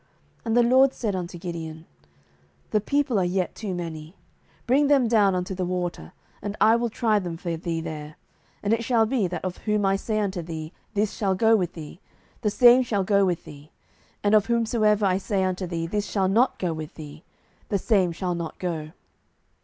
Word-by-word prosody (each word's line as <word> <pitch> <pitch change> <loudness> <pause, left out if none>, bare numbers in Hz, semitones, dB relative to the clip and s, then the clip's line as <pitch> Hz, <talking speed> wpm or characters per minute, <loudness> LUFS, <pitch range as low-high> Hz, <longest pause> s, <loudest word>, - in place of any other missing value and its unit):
07:007:004 - - -38 0.4
And 225 +1 +1
the 240 - +6
LORD 260 +3 +5
said 210 -5 -2
unto 175 -1 -5
Gideon, 165 -2 -6 0.9
The 215 - +2
people 270 -2 +1
are - - +2
yet 180 +1 -1
too 200 -5 -5
many; 165 -1 -6 0.5
bring 275 +4 +3
them 275 -4 +4
down 205 -4 +3
unto 180 +1 -2
the 185 0 -3
water, 175 - -3 0.3
and 205 0 -5
I 220 +1 +6
will 235 0 0
try 220 -1 +1
them 175 -4 -5
for 170 -1 -3
thee 165 0 -3
there: 150 -1 -7 0.5
and 205 +2 +2
it 230 0 0
shall 230 -2 +3
be, 220 -4 0
that 175 +1 -5
of 185 -1 -4
whom 210 -2 0
I 195 0 +2
say 215 +2 -2
unto 195 -4 -2
thee, 160 -1 -7 0.2
This 210 0 +1
shall 195 -3 0
go 225 +4 +4
with 180 -5 -1
thee, 160 +1 -9 0.4
the 215 - +1
same 245 +4 +6
shall 210 -6 0
go 200 +1 +3
with 175 -2 -1
thee; 145 0 -12 0.5
and 205 +1 +2
of 215 -1 +4
whomsoever 220 -3 +2
I 190 0 +2
say 195 -1 -1
unto 185 0 -2
thee, 165 -1 -3
This 205 +4 -2
shall 195 -2 +1
not 230 +7 +2
go 175 -3 -1
with 155 -1 -7
thee, 150 +1 -10 0.5
the 200 - +1
same 190 -3 +2
shall 180 +1 -2
not 170 -2 -5
go. 160 -4 -4
190 Hz, 205 wpm, -25 LUFS, 170-220 Hz, 0.9 s, the